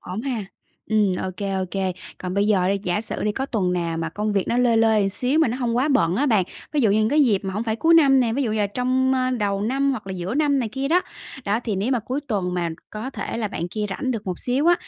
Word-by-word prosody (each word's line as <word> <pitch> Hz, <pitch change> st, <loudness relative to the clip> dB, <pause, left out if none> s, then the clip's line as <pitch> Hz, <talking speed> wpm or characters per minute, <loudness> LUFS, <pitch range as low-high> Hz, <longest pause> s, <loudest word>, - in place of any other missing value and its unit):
Ổn 185 Hz, +5 st, -5 dB
ha. 245 Hz, -6 st, -2 dB, 0.4 s
Ừm, 210 Hz, -4 st, +2 dB
ô 185 Hz, -, -3 dB
kê, 200 Hz, -2 st, -3 dB
ô 190 Hz, -1 st, 0 dB
kê. 190 Hz, -2 st, -1 dB, 0.3 s
Còn 180 Hz, 0 st, -4 dB
bây 200 Hz, +1 st, +2 dB
giờ 190 Hz, -4 st, +3 dB
đi, 200 Hz, 0 st, +1 dB
giả 180 Hz, +2 st, 0 dB
sử 225 Hz, -, -3 dB
đi, 210 Hz, -, +1 dB
có 270 Hz, +4 st, -3 dB
tuần 195 Hz, -8 st, 0 dB
nào 170 Hz, -2 st, -1 dB
mà 165 Hz, 0 st, -2 dB
công 210 Hz, +5 st, -2 dB
việc 195 Hz, -2 st, 0 dB
nó 235 Hz, -, +1 dB
lơi 240 Hz, -2 st, +3 dB
lơi 220 Hz, -2 st, +4 dB
một 195 Hz, -, +1 dB
xíu 250 Hz, +9 st, 0 dB
nó 245 Hz, -, -2 dB
hông 240 Hz, -2 st, -1 dB
quá 270 Hz, +5 st, +2 dB
bận 180 Hz, -, +2 dB
á 290 Hz, +4 st, +2 dB
bạn, 215 Hz, -7 st, +3 dB, 0.3 s
ví 295 Hz, -, +2 dB
dụ 220 Hz, -5 st, +3 dB
như 215 Hz, -, +3 dB
những 215 Hz, -, +2 dB
cái 295 Hz, +2 st, +4 dB
dịp 210 Hz, -6 st, +3 dB
mà 190 Hz, -, -3 dB
hổng 215 Hz, -, -1 dB
phải 220 Hz, -1 st, -1 dB
cuối 330 Hz, +7 st, +4 dB
năm 275 Hz, -5 st, +6 dB
nè, 230 Hz, -2 st, +1 dB
ví 275 Hz, +3 st, 0 dB
dụ 230 Hz, -, -1 dB
như 220 Hz, -, -1 dB
là 205 Hz, -, +2 dB
trong, 255 Hz, +4 st, +1 dB
ơ, 255 Hz, 0 st, +1 dB
đầu 205 Hz, -5 st, -1 dB
năm 275 Hz, +5 st, +1 dB
hoặc 260 Hz, -, -4 dB
là 190 Hz, -, -4 dB
giữa 185 Hz, +5 st, -4 dB
năm 290 Hz, -2 st, +2 dB
này 235 Hz, -4 st, -1 dB
kia 270 Hz, +4 st, -3 dB
đó. 350 Hz, +4 st, +4 dB, 0.4 s
Đó, 205 Hz, +3 st, 0 dB
thì 215 Hz, -4 st, -1 dB
nếu 205 Hz, +7 st, -1 dB
mà 245 Hz, -, +2 dB
cuối 255 Hz, +6 st, -3 dB
tuần 185 Hz, -5 st, -1 dB
mà 175 Hz, -2 st, 0 dB, 0.2 s
có 220 Hz, +5 st, -5 dB
thể 255 Hz, -, -5 dB
là 220 Hz, -3 st, -2 dB
bạn 170 Hz, -1 st, -4 dB
kia 210 Hz, +3 st, -3 dB
rảnh 260 Hz, +6 st, -2 dB
được 225 Hz, -5 st, -4 dB
một 180 Hz, -2 st, -3 dB
xíu 260 Hz, +5 st, 0 dB
á, 345 Hz, -, +7 dB
220 Hz, 300 wpm, -23 LUFS, 195-260 Hz, 0.4 s, á